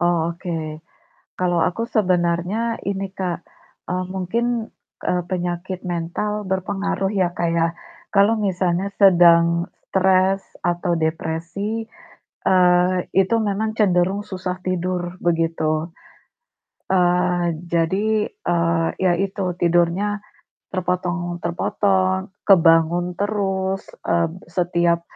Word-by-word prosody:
Oh, 170 -1 +1
oke. 160 -3 -5 0.6
Kalau 175 -1 +1
aku 175 +7 0
sebenernya 185 +3 +1
ini, 195 -1 -2
Kak, 180 -3 -3 0.5
eee, 185 0 -1
mungkin, 230 +5 -1 0.3
eee, 180 0 +1
penyakit 180 0 -3
mental 185 +4 -3
berpengaruh 195 +1 -1
ya, 180 -3 0
Kak, 170 - 0
ya. 165 0 +2 0.5
Kalau 210 +3 +4
misalnya 185 -2 0
sedang 170 -3 +5 0.2
stres 190 0 +3 0.2
atau 175 0 0
depresi, 165 +7 -2 0.6
eee, 180 0 +4 0.2
itu 195 +4 +3
memang 215 0 -1
cenderung 190 0 +3
susah 185 -2 -4
tidur, 180 -1 -2
begitu. 165 -1 0 0.9
Eee, 180 -1 +2 0.2
jadi, 200 +6 +1
eee, 170 -1 0
ya 185 -2 +2
itu 190 0 -1
tidurnya 175 +5 +1 0.5
terpotong 175 -1 -2
terpotong, 190 +2 0 0.2
kebangun 175 -1 +4
terus, 195 -2 -1 0.2
eee, 170 -1 +2 0.2
setiap 170 0 +1
180 Hz, 100 wpm, -21 LUFS, 170-195 Hz, 0.9 s, sedang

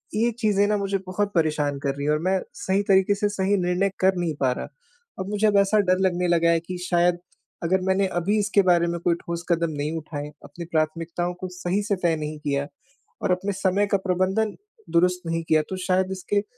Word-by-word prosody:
ये 230 +3 +2
चीज़ें 205 -3 +2
ना 210 0 +1
मुझे 200 0 -1
बहुत 205 +2 -1
परेशान 150 -3 +1
कर 140 -1 0
रही 140 0 -4
हैं 150 - +2
और 150 - +1
मैं 190 0 +2 0.2
सही 195 +2 +1
तरीके 190 +1 +4
से 205 +1 0
सही 200 0 +1
निर्णय 180 +2 +1
कर 190 0 +3
नहीं 170 -3 -1
पा 130 -2 +3
रहा। 125 - -4 0.5
अब 190 +1 -4
मुझे 210 +1 +2
अब 205 -1 +3
ऐसा 200 +2 +4
डर 185 - +4
लगने 180 0 -1
लगा 170 -1 +3
है 165 - +3
कि 180 +2 -7
शायद, 175 0 +3 0.5
अगर 185 +3 +2
मैंने 190 +1 +2
अभी 205 +5 +1
इसके 205 0 +3
बारे 170 -1 +3
में 170 0 -2
कोई 170 0 +2
ठोस 170 0 -6
कदम 170 -1 +1
नहीं 150 +3 -2
उठाए, 150 -2 -6
अपनी 170 - -8
प्राथमिकताओं 165 +2 -1
को 185 - -3
सही 180 +2 -1
से 205 -1 0
तय 170 -2 +3
नहीं 150 0 -5
किया 145 -1 -1 0.5
और - - 0
अपने 190 +3 0
समय 195 +1 +1
का 200 - +2
प्रबंधन 190 +4 +1 0.4
दुरुस्त 180 +1 +3
नहीं 165 0 -1
किया, 155 -1 +5
तो 190 - -4
शायद 185 0 +2
इसके 195 +2 -1
180 Hz, 215 wpm, -24 LUFS, 165-195 Hz, 0.5 s, किया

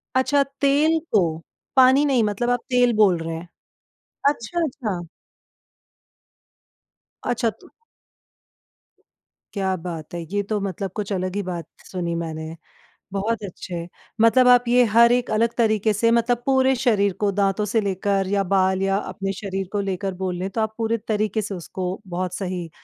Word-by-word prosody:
अच्छा, 280 +2 +3 0.2
तेल 295 +4 +3
को, 210 - +6 0.5
पानी 260 +2 +6
नहीं 260 -5 +3
मतलब 210 +3 -1
आप 245 0 +2
तेल 245 -1 +3
बोल 205 -5 +4
रहे 165 0 -4
हैं। 165 +2 -8 0.8
अच्छा, 295 +5 -2
अच्छा। 235 - -4 2.2
अच्छा 235 -1 +1
तो - - -16 1.9
क्या 190 -2 0
बात 165 -2 -7
है! 170 - -4
ये 205 0 +1
तो 210 +1 -2
मतलब 195 -1 -3
कुछ 210 -1 -4
अलग 185 0 -2
ही 205 - 0
बात 175 -3 -5 0.2
सुनी 175 -2 -3
मैंने, 160 -1 -5 0.6
बहुत 215 +3 -1
अच्छे 175 -3 -6 0.3
मतलब 250 +3 +5
आप 245 -1 +7
ये 245 +1 +5
हर 235 +1 +7
एक 245 0 +1
अलग 230 +2 +2
तरीके 220 -2 +2
से 230 +3 +2
मतलब 235 +1 +2
पूरे 265 -1 +3
शरीर 210 -6 +2
को 205 -1 +2
दाँतों 200 +1 +1
से 220 +2 +1
लेकर 195 0 0
या 200 +1 +1
बाल 190 0 +2
या 195 0 +1
अपने 195 -1 -4
शरीर 195 -1 -4
को 205 - -1
लेकर 195 0 -3
बोले 180 -2 -2
ले, 190 +2 -2
तो 220 +3 -2
आप 220 0 -1
पूरे 230 0 0
तरीके 215 0 0
से 205 -1 -5
उसको 180 +1 -5 0.2
बहुत 180 0 -2
सही 180 -3 -4
205 Hz, 160 wpm, -23 LUFS, 185-235 Hz, 2.2 s, आप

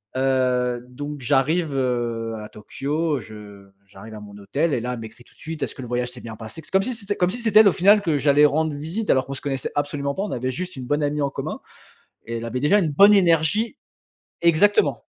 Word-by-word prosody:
Heu, 125 -2 +1
donc 145 +2 -7
j'arrive, 145 +4 +1
heu, 120 -3 -1
à 105 0 -8
Tokyo, 145 +7 -3
je 105 -3 -12 0.2
j'arrive 100 +3 -12
à - - -8
mon 105 -1 -12
hôtel 140 +11 -1
et 125 - +1
là 125 +1 -3
elle 120 - -6
m'écrit 115 +2 -11
tout - - -25
de - - -28
suite: 160 -1 -7
«Est-ce - - -4
que 130 - -8
le 125 - -7
voyage 125 0 -2
s'est 125 -1 -9
bien 115 -1 -8
passé?» 110 +8 -9
C'est 155 - -16
comme 190 0 +4
si 255 +5 -3
c'était 205 -2 -4
comme 180 - +1
si 220 - -4
c'était 220 -3 +4
elle 215 - +8
au - - +6
final 200 +4 +5
que 160 -6 0
j'allais 145 +1 +4
rendre 155 +1 +1
visite 165 +10 -5
alors 130 -1 +2
qu'on 135 - -5
se - - -9
connaissait 135 -2 -3
absolument 145 -1 -2
pas. 195 - -2
On 210 - -4
avait 130 +1 -2
juste 180 +5 -5
une 130 -2 -7
bonne 145 +3 0
amie 145 +1 -1
en 140 - +1
commun - - -5 0.7
et 115 0 -4
elle 115 - -6
avait 120 +2 -3
déjà 150 +9 +4
une 170 -7 +1
bonne 200 +8 +6
énergie 180 +4 +2 0.7
exactement. 170 +5 +3
140 Hz, 240 wpm, -23 LUFS, 125-165 Hz, 0.7 s, elle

